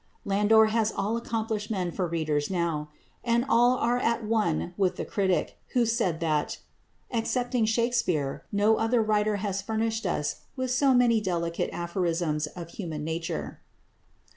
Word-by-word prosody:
Landor 210 +2 +5
has 220 -1 +2
all 210 +3 -1
accomplished 220 -2 -3
men 185 -5 -1
for 180 +1 -2
readers 155 -3 -1
now. 170 -5 -1 0.3
And 235 +1 +2
all 245 -1 +4
are 240 +1 +1
at 235 -1 0
one 210 -6 0
with 190 -2 +1
the - - -4
critic 190 -6 0
who 245 -2 +3
said 225 -8 0
that, 155 -3 0 0.5
"excepting 245 0 0
Shakspere, 220 - 0
no 210 +2 +3
other 225 +1 +2
writer 215 0 +1
has 195 -1 -1
furnished 220 0 -1
us 150 -4 -1 0.2
with 260 -2 -2
so 265 +1 +4
many 235 -3 +4
delicate 170 -3 -1
aphorisms 170 -3 -1
of 170 +1 -9
human 160 -6 -5
nature." 165 +1 -4
210 Hz, 145 wpm, -27 LUFS, 170-230 Hz, 0.5 s, Landor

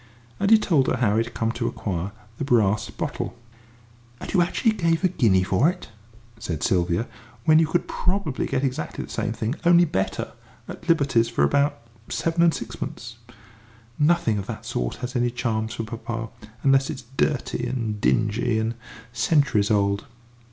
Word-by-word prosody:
And 200 0 +1
he 225 - +8
told 160 -10 +2
her - - +2
how 110 -4 +2
he 115 - +3
had 120 0 -11
come 115 0 0
to 120 0 -2
acquire 95 -3 -3 0.3
the - - -1
brass 110 -6 +2
bottle. - - -4 0.8
"And - - -7
you 185 - +4
actually 200 +6 +2
gave 165 -4 0
a - - +6
guinea 110 - +3
for 100 - +3
it?" 180 -7 -6 0.5
said 80 -7 -4
Sylvia, 90 +3 +1 0.4
"when 155 0 +6
you 160 - +3
could 175 +2 0
probably 180 -7 -1
get 130 - -1
exactly 130 -12 -2
the - - -13
same - - -2
thing, 115 +1 -2
only 175 0 +6
better, 95 - -2 0.4
at 175 - -9
Liberty's 135 -8 +3
for 70 - +1
about 140 - +2 0.3
seven 165 +1 0
and 170 -1 +6
sixpence! 115 0 -6 0.8
Nothing 145 -9 +3
of 100 - -6
that - - -6
sort - - -2
has 125 +2 -6
any 120 0 +2
charms 115 -2 -2
for 115 - -3
papa, 115 +1 -5 0.3
unless 135 0 +4
it's 140 -4 -5
dirty 130 -4 0
and 115 -4 -3
dingy 110 +1 +1
and 110 +1 0 0.4
centuries 120 -4 +2
old." 100 -1 +1
120 Hz, 170 wpm, -24 LUFS, 110-155 Hz, 0.8 s, he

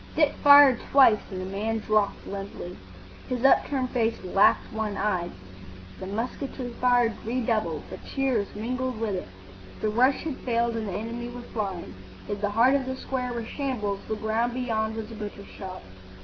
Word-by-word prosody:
Dick 300 -2 +3
fired 285 -3 +9
twice, 260 -6 +7
and 185 - -5
the 185 - -4
man 210 +4 -2
dropped 215 -1 0
limply. 195 -2 -6 0.5
His 250 0 -1
upturned 265 -1 +3
face 230 -2 +1
lacked 195 +2 +3
one 215 -2 -2
eye. 185 -4 0 0.7
The 185 - -6
musketry 245 +4 -4
fire 245 -2 +4
redoubled, 220 -9 -1
but - - -9
cheers 255 -7 0
mingled 250 +2 -3
with 220 -3 -1
it. 185 - -4 0.5
The 215 - 0
rush 255 +5 +3
had 310 -5 -4
failed 235 -1 0
and 220 -2 -3
the 195 - -4
enemy 230 +4 -4
were 245 0 -8
flying. 190 - -3 0.3
If 205 0 -4
the 205 - +1
heart 230 +6 +4
of 270 -2 +1
the 260 - -2
square 255 -1 -3
were 235 -2 -4
shambles, 220 -7 -2
the 220 - -1
ground 220 +3 -1
beyond 220 -3 -1
was 225 0 -6
a - - -7
butcher's 205 -2 -7
shop. 185 -2 -9
225 Hz, 175 wpm, -26 LUFS, 205-250 Hz, 0.7 s, fired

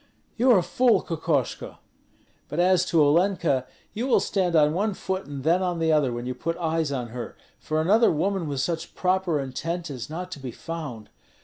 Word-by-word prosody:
"You 245 +2 +2
are 240 - +7
a 180 - +2
fool, 245 +3 +3
Kokoshko! 160 -5 -2 0.7
But 150 - -3
as 180 0 +4
to 165 -4 +3
Olenka 155 -4 +2 0.3
you 230 +5 -2
will 265 - +4
stand 180 -4 0
on 150 -1 +4
one 200 +3 0
foot 190 0 -4
and 140 -2 -6
then 170 +4 +3
on 180 -2 -1
the 165 -1 +1
other 150 -5 +3
when 120 0 -5
you 125 - -2
put 165 +6 -3
eyes 160 -3 -1
on 125 -4 -3
her, 120 +1 -7 0.2
for 155 0 -2
another 210 +8 +4
woman 180 +2 -1
with 140 -2 -2
such 165 +4 -3
proper 185 -4 +1
intent 165 +5 -4
is 125 -2 -6
not 180 +4 -6
to 150 - -7
be 130 -2 -6
found. 145 -8 -7
165 Hz, 200 wpm, -25 LUFS, 145-185 Hz, 0.7 s, are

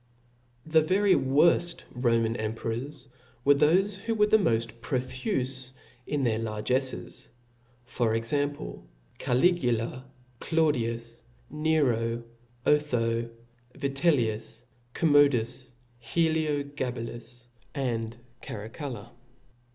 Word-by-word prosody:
The 160 0 +4
very 190 +5 +3
worft 170 +5 +3
Roman 115 -2 +1
emperors, 120 +5 -4 0.4
were 145 - +7
thofe 185 +8 +3
who 225 +4 -2
were 210 -1 +4
moft 115 - +2
profufe 130 - -2 0.3
in 145 -2 -1
their 110 -3 +1
largefles, 120 +3 -2 0.6
for 120 -2 0
exam 140 +6 0
ple, - - -9 0.3
Caligula^ 125 -4 +1 0.4
Claudius, 120 -8 0 0.3
Nero^ 125 -7 +1 0.4
Otho^ 115 -6 +1 0.5
Vitellius^ 135 -6 0 0.3
Com 160 -3 +2
modus^ 130 -3 +3 0.3
HdiogabaltiSy 140 -6 -2 0.3
and 115 -4 -2 0.2
Caracalla. 120 -1 -7
130 Hz, 80 wpm, -28 LUFS, 115-150 Hz, 0.6 s, were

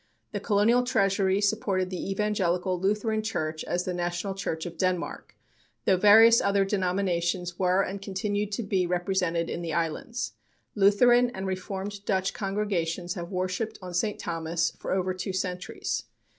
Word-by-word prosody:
The 205 - -3
Colonial 215 +4 +3
Treasury 195 -5 +2
supported 195 -3 0
the 185 +1 -4
Evangelical 185 -3 0
Lutheran 210 +3 0
Church 160 -8 -3
as 175 0 -1
the 180 - -3
national 175 +2 -2
church 165 -5 -3
of 170 -1 -6
Denmark, 185 -2 -2 0.5
though 190 - +5
various 220 +4 +7
other 200 0 +2
denominations 180 -2 -1
were 185 +1 +3
and 195 +1 -5
continue 205 +1 -2
to 210 +3 -3
be 190 -3 0
represented 175 -2 0
in - - -4
the 165 -2 -3
islands. 230 - -2 0.4
Lutheran 240 +5 +5
and 190 - -4
Reformed 195 +2 -4
Dutch 190 -1 0
congregations 185 -4 -2
have 170 -2 -6
worshipped 185 +4 -2
on 180 -2 -8
St. 205 +4 0
Thomas 165 0 -1
for - - -7
over 185 0 0
two 185 +1 -4
centuries. 180 -7 -3
190 Hz, 150 wpm, -27 LUFS, 180-205 Hz, 0.5 s, various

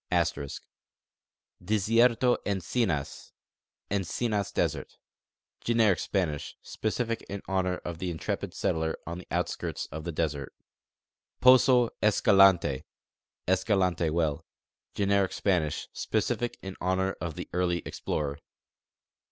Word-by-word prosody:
* - - -3 1.5
Disierto 115 +5 +3
Encinas 95 - -2 0.6
(Encinas 100 +2 -1
desert): - - -2 0.7
Generic 115 -6 +3
Spanish, 85 -7 -2
specific 115 +2 -2
in 100 0 -5
honor 95 -1 0
of 85 -1 -5
the 90 - -2
intrepid 80 -3 -4
settler 80 0 -1
on 85 +1 -5
the 90 - -12
outskirts - - -2
of 80 +2 -6
the 85 - -3
desert. 75 -3 -3 0.8
Poso 125 -1 +6
Escalante 95 -9 +4 0.6
(Escalante 95 -3 +2
well): 80 -1 0 0.5
Generic 100 -1 +2
Spanish, 90 -7 0
specific 120 -1 -1
in 95 -1 -6
honor 95 +1 0
of 80 -2 -4
the - - -6
early 90 -1 0
explorer. 70 -1 -3
95 Hz, 105 wpm, -28 LUFS, 85-105 Hz, 1.5 s, Poso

